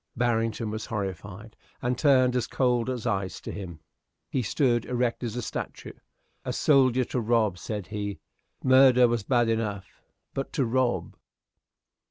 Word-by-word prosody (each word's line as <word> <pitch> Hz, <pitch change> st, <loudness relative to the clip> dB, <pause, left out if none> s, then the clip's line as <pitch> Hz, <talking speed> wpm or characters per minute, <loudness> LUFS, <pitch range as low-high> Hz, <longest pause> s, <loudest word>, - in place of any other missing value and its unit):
Barrington 115 Hz, -2 st, 0 dB
was 110 Hz, 0 st, -5 dB
horrified, 100 Hz, +1 st, -5 dB, 0.2 s
and 125 Hz, +1 st, -1 dB
turned 130 Hz, -4 st, +4 dB
as 125 Hz, -2 st, 0 dB
cold 125 Hz, -2 st, +1 dB
as 125 Hz, -3 st, -4 dB
ice 95 Hz, -5 st, -2 dB
to -, -, -6 dB
him. 85 Hz, -5 st, -7 dB, 0.5 s
He 130 Hz, -, 0 dB
stood 120 Hz, +1 st, +1 dB
erect 125 Hz, -1 st, -1 dB
as 115 Hz, -2 st, -3 dB
a 125 Hz, -, -3 dB
statue. -, -, -6 dB, 0.5 s
"A -, -, -3 dB
soldier 130 Hz, -3 st, +3 dB
to 125 Hz, -, -2 dB
rob!" 110 Hz, -5 st, +1 dB
said 105 Hz, -4 st, -4 dB
he. 100 Hz, +1 st, -4 dB, 0.5 s
"Murder 130 Hz, -1 st, +6 dB
was 120 Hz, -1 st, 0 dB
bad 120 Hz, +2 st, +2 dB
enough 105 Hz, -4 st, -3 dB, 0.3 s
but 135 Hz, -, -4 dB
to 135 Hz, -, +1 dB
rob!" 125 Hz, +1 st, 0 dB
115 Hz, 150 wpm, -27 LUFS, 105-125 Hz, 0.5 s, Murder